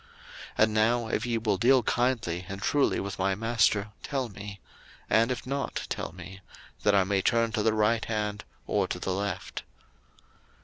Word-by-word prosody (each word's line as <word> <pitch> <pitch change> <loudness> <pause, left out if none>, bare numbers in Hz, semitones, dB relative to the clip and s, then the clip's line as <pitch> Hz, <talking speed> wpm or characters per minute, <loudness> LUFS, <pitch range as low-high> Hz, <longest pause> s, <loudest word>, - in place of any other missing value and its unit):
01:024:049 470 - -26 0.6
And 110 - -4
now 115 +2 +2
if - - -1
ye 115 -1 +1
will 110 -3 0
deal 125 +4 +4
kindly 115 -9 0
and 95 0 -5
truly 140 +7 +2
with 100 -1 -5
my 95 +1 +1
master, 110 -1 +2
tell 135 -4 -2
me: 100 0 -9 0.5
and 115 +3 +4
if 125 - -4
not, 140 +2 -3
tell - - -3
me; 95 +1 -10 0.4
that 105 -1 +3
I 95 - +5
may 95 +1 +1
turn 115 +2 +2
to 110 -2 0
the 110 +1 +2
right 110 +1 +2
hand, 105 -1 -2 0.2
or 100 -2 +1
to - - -3
the 95 +1 -2
left. 100 +1 -3
110 Hz, 180 wpm, -28 LUFS, 100-120 Hz, 0.6 s, I